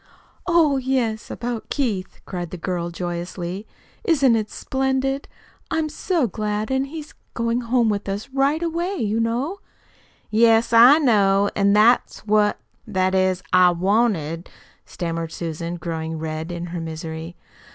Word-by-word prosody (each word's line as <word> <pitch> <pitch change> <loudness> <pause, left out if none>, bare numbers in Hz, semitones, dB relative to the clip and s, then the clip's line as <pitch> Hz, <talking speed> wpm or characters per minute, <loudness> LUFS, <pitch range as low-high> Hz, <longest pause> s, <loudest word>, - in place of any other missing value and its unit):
"Oh, 325 -5 +4
yes, 250 -4 -1
about 240 -2 -4
Keith," 215 -10 -2
cried 175 -2 -5
the 180 - -7
girl 175 0 -3
joyously. 175 +3 -5 0.4
"Isn't 275 - +4
it 215 -1 -1
splendid! 265 +1 -1 0.4
I'm 320 -1 0
so 325 -1 0
glad! 210 +1 -2
And 265 +1 +1
he's 305 +1 -8 0.2
going 230 +1 0
home 240 0 +2
with 205 -2 -1
us 200 +5 -3
right 280 +4 +1
away, 340 +3 -1
you 220 - -1
know." 245 +12 -1 0.7
"Yes, 225 +1 +4
I 245 +6 +9
know. 205 -8 +3
An' 200 0 +3
that's 220 +2 +3
what 210 0 +3 0.3
that 185 -3 0
is, 185 -1 +1
I 185 -1 +7
wanted 175 -3 0 0.2
" - - -32
stammered 165 -1 -4
Susan, 170 +1 -4
growing 160 -1 -4
red 160 +1 -4
in 175 0 -4
her 175 - -3
misery. 160 +1 -6
215 Hz, 140 wpm, -22 LUFS, 175-260 Hz, 0.7 s, I